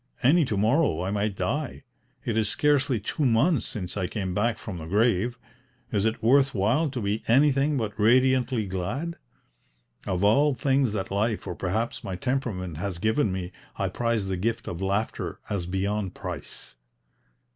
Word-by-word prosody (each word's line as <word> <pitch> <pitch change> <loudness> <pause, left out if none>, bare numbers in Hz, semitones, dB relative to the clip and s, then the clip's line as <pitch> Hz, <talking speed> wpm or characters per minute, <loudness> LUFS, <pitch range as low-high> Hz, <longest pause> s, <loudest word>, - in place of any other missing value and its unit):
Any 155 +5 +5
to 110 -5 -2
morrow 110 - +2
I 95 - -2
might 105 0 -1
die. 125 +10 -2 0.4
It 115 - -1
is 110 -2 +1
scarcely 145 -4 +2
two 110 +8 -3
months 130 +3 +3
since 90 -4 -5
I 95 -3 -1
came 95 -2 -3
back 110 +3 +1
from 95 -5 -7
the 80 - -7
grave: 110 +4 +2 0.5
is 105 +1 +2
it 110 0 -3
worth 135 +3 +4
while 120 +11 +2
to 130 -2 -4
be 105 +2 -1
anything 140 +3 +4
but 110 -3 -3
radiantly 125 +1 +3
glad? 105 - -3 0.9
Of 90 +1 -1
all 140 +7 +4
things 135 -4 +1
that 100 -3 -3
life 105 +2 0
or - - -3
perhaps 105 +7 -2
my 95 - -4
temperament 95 - -2
has 95 0 -3
given 110 +3 +1
me 90 -1 -4 0.3
I - - 0
prize 115 -4 -1
the 95 -1 -2
gift 115 +5 -2
of 85 +1 -5
laughter 100 +3 -2
as 95 -4 -2
beyond 95 +1 -2
price." 90 -9 -8
110 Hz, 165 wpm, -26 LUFS, 95-130 Hz, 0.9 s, Any